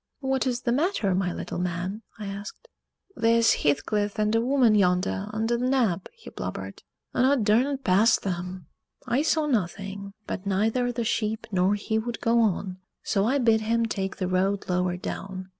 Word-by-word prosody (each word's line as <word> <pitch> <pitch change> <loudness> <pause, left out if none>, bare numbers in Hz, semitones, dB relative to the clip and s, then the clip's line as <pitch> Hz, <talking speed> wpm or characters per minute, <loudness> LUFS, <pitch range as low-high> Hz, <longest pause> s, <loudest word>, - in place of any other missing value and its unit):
"What 265 -1 0
is 245 -1 -1
the 240 - 0
matter, 270 - +1
my 180 -1 0
little - - -5
man?" 180 +4 -3 0.2
I 210 - -6
asked. 200 - -7 0.5
"They's 230 0 +4
Heathcliff 205 +8 0
and 215 0 +1
a 225 - +3
woman 250 -2 +3
yonder, 190 0 +2
under 225 +2 0
t' - - -2
nab," 240 -9 +1
he 465 - -12
blubbered, - - -6 0.3
"un' 250 - +2
aw 280 +2 +4
darnut 255 +4 +2
pass 200 +4 +4
'em." 180 -1 -4 0.4
I 250 +2 +1
saw 315 0 +1
nothing, 200 -4 -2
but 200 +1 -5
neither 220 +6 +1
the 240 -1 -2
sheep 220 -1 -1
nor 190 +1 +2
he 220 +2 -1
would 235 +1 -4
go 230 +1 +2
on, 195 -4 0 0.2
so 200 -1 +1
I 270 +4 +2
bid 225 -4 +3
him 230 +1 +1
take 195 -3 -3
the 185 - -1
road 190 +2 0
lower 180 0 0
down. 185 +1 -6
215 Hz, 175 wpm, -26 LUFS, 190-235 Hz, 0.5 s, They's